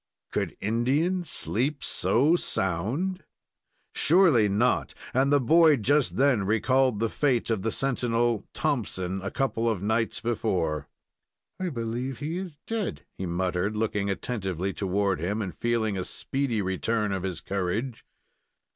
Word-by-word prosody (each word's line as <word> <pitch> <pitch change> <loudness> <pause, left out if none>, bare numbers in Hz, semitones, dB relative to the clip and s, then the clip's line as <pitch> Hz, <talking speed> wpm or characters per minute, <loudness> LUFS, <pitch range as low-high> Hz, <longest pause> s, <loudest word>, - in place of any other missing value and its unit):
Could - - -2
Indian 140 - +1
sleep 140 -2 -1
so 145 +8 +3
sound? 130 - -1 0.7
Surely 155 - +4
not, 105 +6 +1 0.2
and 135 +2 +3
the 145 - +5
boy 155 +3 +5
just 140 +5 +1
then 130 -6 +3
recalled 125 +3 +2
the 115 - +2
fate 125 -1 0
of 110 -4 0
the 115 - 0
sentinel 120 -3 +1
Thompson, 95 -10 -2
a 100 - -3
couple 115 -4 0
of 100 -4 -2
nights 110 +2 0
before. 95 -10 -1 0.7
"I 185 -1 -1
believe 120 0 -3
he 155 +4 -3
is 180 -5 -6
dead," 225 -4 -3
he 95 - -4
muttered, 90 +4 -1
looking 105 -2 0
attentively 95 -3 -2
toward 100 -1 0
him, 100 +7 -1
and 95 -7 -4
feeling 110 -3 0
a - - -1
speedy 125 0 -2
return 105 +3 -1
of 95 -1 -2
his 90 -3 -3
courage. 100 +6 -3
115 Hz, 140 wpm, -27 LUFS, 100-135 Hz, 0.7 s, the